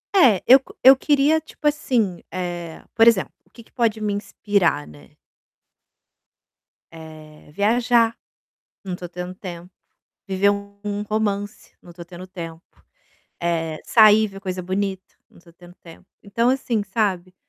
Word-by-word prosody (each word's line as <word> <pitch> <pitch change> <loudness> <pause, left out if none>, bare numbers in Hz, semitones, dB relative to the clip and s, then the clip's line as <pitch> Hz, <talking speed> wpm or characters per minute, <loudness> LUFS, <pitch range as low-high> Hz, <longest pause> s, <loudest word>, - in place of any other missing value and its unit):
É, 245 - +5
eu 260 +2 +9 0.2
eu 265 +1 +9
queria 290 +3 +2
tipo 310 -1 -5
assim, 240 - 0
eh, 175 -2 -6
por 225 0 +5
exemplo, 225 -5 +3 0.2
o - - -30
que 235 +5 -15
que - - -28
pode 230 -3 0
me 210 -1 -2
inspirar, 200 - -1
né. 75 -3 -16 1.8
Eh, 155 -2 -13
viajar, 230 +3 +2 0.7
não 185 -2 -5
tô 180 0 -8
tendo 180 +1 -7
tempo. 180 -1 -9 0.6
Viver 195 +1 +2
um 200 0 -7
um 205 0 -3
romance, 205 -1 -3
não 175 - -15
tô 170 0 -10
tendo 180 +1 -11
tempo, 165 -3 -8 0.8
eh, 165 -2 -2
sair, 215 -1 +6
ver 195 -1 -11
coisa 185 -2 -5
bonita, 190 +1 -4 0.2
não - - -21
tô 170 - -20
tendo 175 +1 -17
tempo, 170 +2 -16 0.2
então 230 +4 0
assim, 245 -5 -1
sabe, 190 -3 -2
195 Hz, 145 wpm, -22 LUFS, 175-220 Hz, 1.8 s, eu